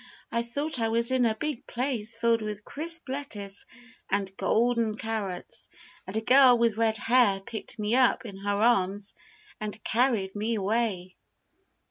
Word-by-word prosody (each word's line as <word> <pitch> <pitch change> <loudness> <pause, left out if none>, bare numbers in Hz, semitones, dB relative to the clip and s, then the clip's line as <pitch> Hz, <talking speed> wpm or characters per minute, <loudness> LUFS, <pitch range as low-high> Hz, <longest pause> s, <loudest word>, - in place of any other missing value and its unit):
I 235 - +1
thought 285 +4 -2
I 225 -1 +1
was 235 +2 +2
in 255 -2 +3
a 220 - 0
big 300 +1 -4
place 235 -3 -2
filled 230 0 +2
with 210 -1 -5
crisp 330 +2 +1
lettuce 220 -8 -2 0.4
and 195 -1 -1
golden 230 -1 +1
carrots, 215 -5 -3 0.4
and 190 +3 -4
a - - 0
girl 255 +1 +7
with 230 -2 +2
red 225 0 +1
hair 225 -3 +3
picked 220 +5 -7
me 210 +1 -1
up 255 0 +3
in 200 -4 -8
her 200 +1 -2
arms 200 -3 +1 0.5
and 215 0 -6
carried 225 -6 +1
me 220 +3 -1
away." 200 -3 -1
225 Hz, 155 wpm, -27 LUFS, 205-245 Hz, 0.5 s, girl